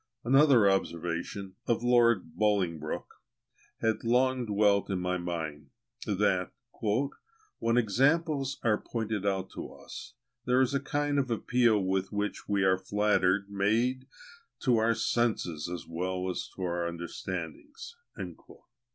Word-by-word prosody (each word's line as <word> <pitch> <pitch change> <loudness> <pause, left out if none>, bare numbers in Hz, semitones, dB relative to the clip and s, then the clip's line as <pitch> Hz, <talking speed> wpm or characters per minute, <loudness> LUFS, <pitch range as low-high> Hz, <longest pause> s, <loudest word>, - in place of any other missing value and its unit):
Another 135 -3 +5
observation, 95 +1 -2
of 120 0 +1
Lord 120 -9 +3
Bolingbroke, 90 -7 -1 0.6
had 110 -1 0
long 125 +1 +2
dwelt 100 -1 +3
in 95 - 0
my 90 0 -1
mind, 80 -5 -5 0.4
that 95 -3 +1 1.1
"when 115 +1 +1
examples 135 - +2
are 110 -2 +2
pointed 110 -3 -3
out 95 -1 -1
to - - -7
us, 120 - -10 0.3
there 125 +1 +3
is 130 0 +2
a 140 - +2
kind 145 +1 0
of 130 -2 -1
appeal 120 0 +2
with 95 0 -1
which 105 0 -3
we 100 -1 +2
are 95 -1 +3
flattered 100 -1 +2
made 115 +6 +1 0.5
to 125 -3 +3
our 115 +1 +3
senses 90 -12 0
as 90 -2 -5
well 90 +2 -2
as - - -5
our 85 -2 -1
understandings." 85 - -6
105 Hz, 125 wpm, -29 LUFS, 90-120 Hz, 1.1 s, Another